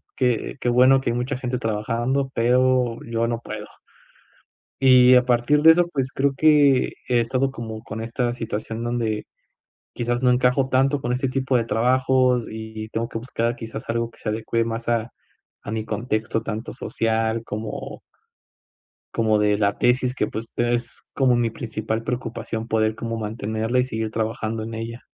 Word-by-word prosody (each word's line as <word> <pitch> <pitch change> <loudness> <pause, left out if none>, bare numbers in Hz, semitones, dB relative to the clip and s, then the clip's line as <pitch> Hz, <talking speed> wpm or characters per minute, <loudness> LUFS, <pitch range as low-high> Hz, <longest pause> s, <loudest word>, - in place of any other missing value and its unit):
que 125 -1 0
que 120 - +1
bueno 130 +2 +5
que 125 - -1
hay 120 - 0
mucha 125 +2 -2
gente 125 -1 -2
trabajando, 120 +4 -1
pero 125 0 +2
yo 115 0 -1
no 115 -1 -2
puedo. 105 -2 -7 1.1
Y 130 -1 +7
a 125 - +5
partir 125 +4 +3
de 160 +1 +9
eso, 175 +1 +3
pues, 135 -5 -2
creo 140 0 +1
que 145 -4 +4 0.2
he 120 - +3
estado 130 +3 0
como 110 -3 -7
con 110 0 -6
esta 120 +1 -1
situación 115 -1 -4
donde 120 -3 -2 0.7
quizás 120 +1 -1
no 125 - +4
encajo 125 +2 +2
tanto 135 +2 +2
con 125 -1 -2
este 130 +1 -1
tipo 130 0 0
de 120 - +3
trabajos 125 +2 +2
y 110 0 -7
tengo 115 +1 -2
que 115 - -5
buscar 115 0 -2
quizás 110 -1 -8
algo 115 0 -1
que - - -22
se - - -3
adecúe 115 +1 -1
más 115 0 -4
a 115 0 0 0.5
a 105 - -6
mi 110 -1 -3
contexto, 110 0 -2
tanto 110 0 -5
social 115 -2 -1
como 110 0 -6 1.1
como 110 -2 +2
de 105 0 +2
la 100 -1 +1
tesis 125 +1 +2
que, 105 - 0
pues, 110 +2 -5
es 120 0 -1
como 130 -3 +3
mi 120 -1 +1
principal 110 -1 -4
preocupación 115 -2 -4
poder 110 -1 +1
como 115 0 -4
mantenerla 110 +2 -2
y 125 - +4
seguir 110 -3 -3
trabajando 110 0 -2
en 115 0 -6
ella. 115 +2 -6
115 Hz, 170 wpm, -23 LUFS, 110-125 Hz, 1.1 s, de